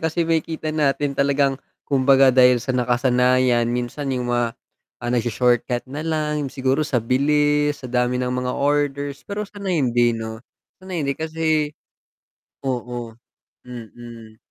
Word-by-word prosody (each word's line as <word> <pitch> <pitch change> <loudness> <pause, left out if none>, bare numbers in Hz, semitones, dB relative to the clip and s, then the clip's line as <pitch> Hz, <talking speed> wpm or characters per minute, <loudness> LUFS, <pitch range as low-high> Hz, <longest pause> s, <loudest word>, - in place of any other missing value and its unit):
kasi 160 +1 0
makikita 160 -1 -1
natin 145 -2 0
talagang, 140 0 +1 0.3
kumbaga 135 -1 +5
dahil 125 -1 +5
sa 125 - -3
nakasanayan, 125 0 +2
minsan 125 +3 -2
yung 125 -1 -2
mga, 120 -1 0 0.5
ah, 120 - -2
nagsho-shortcut 120 +1 +1
na 150 +4 -5
lang 150 -2 -1
siguro 135 +3 0
sa 125 -6 0
bilis, 145 +3 +1
sa 130 - -7
dami 125 0 +1
ng 125 0 -1
mga 125 0 -2
orders, 145 0 -1
pero 205 +1 -3
sana 200 -1 -7
hindi 120 -5 +2
'no, 110 0 -6 0.4
sana 185 0 -8
hindi 140 -5 -2
kasi 160 -2 -1 0.9
oo, 120 -2 -4 0.5
mm. 115 -2 -11
130 Hz, 130 wpm, -22 LUFS, 120-150 Hz, 0.9 s, kumbaga